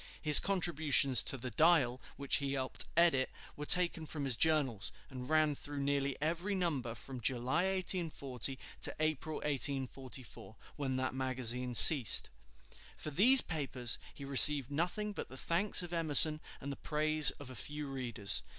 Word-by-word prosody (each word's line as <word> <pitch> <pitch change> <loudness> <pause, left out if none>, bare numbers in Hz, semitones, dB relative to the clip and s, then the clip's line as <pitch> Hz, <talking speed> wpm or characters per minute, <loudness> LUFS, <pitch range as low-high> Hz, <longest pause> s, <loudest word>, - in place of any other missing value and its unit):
His 150 -2 +7
contributions 155 -8 +2
to 135 - -2
the 125 0 -9
"Dial," 135 -2 0 0.2
which 140 0 -1
he 140 -1 -5
helped 130 -1 -4
edit, 165 -6 +1 0.3
were 150 0 -10
taken 170 -3 +5
from 145 -1 -7
his 130 -3 +1
journals, 140 -7 -2 0.2
and 125 0 -10
ran 155 -1 0
through 145 0 -8
nearly 140 -1 -3
every 170 +7 -4
number 145 -11 -4
from 130 0 -11
July, 130 - -3
1840, 150 -8 -2 0.2
to - - -2
April, 155 0 -4
1844, 135 -6 -3 0.2
when 135 -3 -5
that 130 0 -4
magazine 125 -1 -3
ceased. 130 -3 +6 0.7
For 155 - -8
these 250 - +4
papers 135 -7 -5
he 140 - -13
received 140 0 +6
nothing 180 +8 -4
but - - -9
the 130 - -13
thanks 180 +6 +1
of 175 0 -10
Emerson 155 -2 +4 0.2
and 140 - -9
the 140 - -9
praise 155 -1 0
of 135 -3 -12
a - - -12
few 150 +6 -8
readers. 120 -7 -2
140 Hz, 155 wpm, -31 LUFS, 130-155 Hz, 0.7 s, His